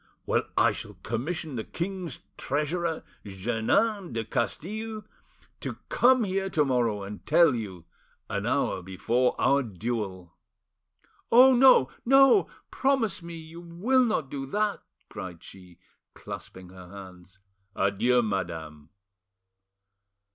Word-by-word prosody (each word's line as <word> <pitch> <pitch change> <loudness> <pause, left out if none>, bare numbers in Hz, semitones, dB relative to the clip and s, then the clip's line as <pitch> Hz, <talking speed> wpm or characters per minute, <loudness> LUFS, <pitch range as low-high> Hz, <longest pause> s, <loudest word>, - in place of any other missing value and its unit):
Well, - - +1
I - - +5
shall - - -7
commission 140 - -3
the 110 - -3
king's 180 - -5
treasurer, 160 +4 -2 0.2
Jeannin 120 - 0
de 115 -1 -2
Castille, 215 - -3 0.6
to - - -5
come 255 0 +4
here 195 -1 -1
to 155 -5 +2
morrow 120 -6 0
and 100 +1 -8
tell 170 -5 +5
you, 95 -8 -6 0.4
an - - -3
hour - - 0
before 115 +7 0
our 140 +1 +3
duel." 100 -5 -4 1.0
"Oh 255 +3 +8
no! 250 - +6
no! 270 +7 +5 0.2
Promise 260 -10 +1
me 170 0 -8
you 165 +1 -10
will 195 +10 +1
not 190 - -1
do 135 -1 -4
that!" 210 +6 -1 0.3
cried 95 -5 -8
she, 90 -3 -14 0.4
clasping 95 -1 -9
her 90 -1 -13
hands. 95 -1 -12 0.4
"Adieu, 120 +6 +2
madame." 80 -7 -4
130 Hz, 120 wpm, -27 LUFS, -, 1.0 s, Oh